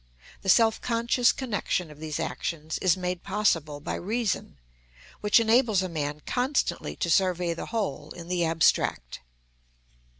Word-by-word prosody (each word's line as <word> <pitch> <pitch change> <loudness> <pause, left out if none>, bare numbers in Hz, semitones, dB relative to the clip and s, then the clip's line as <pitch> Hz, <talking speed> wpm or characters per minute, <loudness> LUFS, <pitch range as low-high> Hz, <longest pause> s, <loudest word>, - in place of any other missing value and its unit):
The 190 - -3
self 225 +2 +4
conscious 235 +1 +2
connection 205 - -2
of 150 - -14
these 155 -1 -4
actions 160 -1 -3
is 185 -1 +3
made 180 -1 -3
possible 165 -8 0
by 145 - -4
reason, 210 - -2 0.6
which 210 +2 +4
enables 225 -3 +3
a - - -2
man 150 -2 -3
constantly 260 +3 -1
to 170 - -2
survey 180 -1 +2
the 165 - -6
whole 190 -9 -3
in 170 +1 -9
the 180 -1 0
abstract. 160 - +1
180 Hz, 140 wpm, -27 LUFS, 160-220 Hz, 0.6 s, self